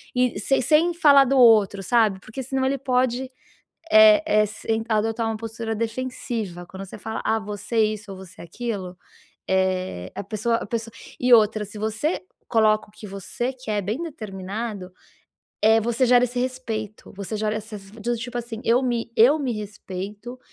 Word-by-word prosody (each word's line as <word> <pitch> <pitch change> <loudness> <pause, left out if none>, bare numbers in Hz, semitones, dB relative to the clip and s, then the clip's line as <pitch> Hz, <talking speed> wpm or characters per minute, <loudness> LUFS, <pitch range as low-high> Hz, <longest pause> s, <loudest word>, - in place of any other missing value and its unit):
E 250 -4 +1
se 270 +6 +1
sem 315 +6 +3
falar 290 -5 +6
do 270 +1 +1
outro, 215 -5 +5
sabe, 215 -2 +2
porque 220 +7 -7
se 265 - -12
não 265 - +1
ele 275 +1 +1
pode, 255 -1 0 0.7
eh 325 -1 +8
eh, 215 -9 +4
s 210 +1 -7
tentar 225 0 0
adotar 225 +2 -1
uma 225 - -1
postura 225 0 -5
defensiva. 230 -5 -4
Quando 190 +2 -8
você 195 - -11
fala: 220 +2 -5
"Ah, 220 0 +2
você 210 +1 -6
é - - +6
isso 205 -1 -11
ou 190 - -8
você 185 -1 -13
é - - -8
aquilo", 190 -1 -5 0.5
eh, 185 - -1
a - - -5
pessoa 215 +3 -1
a - - -5
pessoa 230 +1 -4 0.3
e 250 0 +2
outra, 215 -1 +3
se 205 - -12
você 220 - -1 0.3
coloca 215 -2 +3
o - - -21
que 215 - -11
você 200 +6 -4
quer 220 -6 -3
bem 215 - -3
determinado, 205 - -6 0.7
eh, 220 +1 +5
você 235 +3 +1
gera 245 0 +5
esse 245 0 -4
respeito, 230 -5 -5
você 200 +2 -5
gera 215 0 -1
essa 215 0 -7
s 195 -1 -13 0.3
tipo 245 +1 -5
assim: 235 -1 -6
"Eu 240 +3 +3
me 240 -2 -1
eu 260 +8 +6
me 270 -5 -1
respeito, 210 +2 -7
225 Hz, 185 wpm, -23 LUFS, 205-245 Hz, 0.7 s, eh